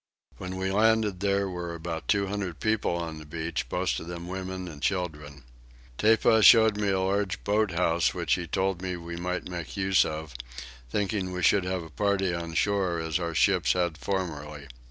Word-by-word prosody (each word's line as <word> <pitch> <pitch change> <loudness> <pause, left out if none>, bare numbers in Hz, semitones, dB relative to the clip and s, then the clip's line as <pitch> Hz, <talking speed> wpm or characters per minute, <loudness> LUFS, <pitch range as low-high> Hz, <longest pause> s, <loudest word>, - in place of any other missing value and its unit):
When 90 0 -5
we 95 0 -1
landed 110 -2 +2
there 100 0 +1
were 90 -2 -5
about 80 -1 -5
two 100 -1 +2
hundred 95 -4 -4
people 110 -5 0
on 80 -2 -4
the 75 - -11
beach, 80 -4 -3
most 90 +1 0
of 80 - -9
them 85 0 -6
women 95 0 -5
and 75 -4 -9
children. 75 -8 -3 0.6
Tepa 110 +1 +4
showed 110 -1 +7
me 105 -1 0
a 95 -1 +1
large 100 +1 -1
boat 105 +1 +2
house 85 -1 +2
which 85 -4 0
he 85 -2 -1
told 95 +1 -1
me 90 -1 -3
we 85 0 -7
might 90 +1 -3
make 90 +1 -6
use 95 -1 +4
of, 80 -2 -5 0.6
thinking 100 - -1
we 90 -1 -4
should 95 +1 +4
have 90 -1 -2
a 80 - -12
party 95 0 0
on 85 -1 -5
shore 95 -3 +1
as 80 +1 -1
our 85 -2 -3
ships - - +3
had 85 -3 0
formerly. 75 -6 -4
90 Hz, 190 wpm, -27 LUFS, 85-100 Hz, 0.6 s, showed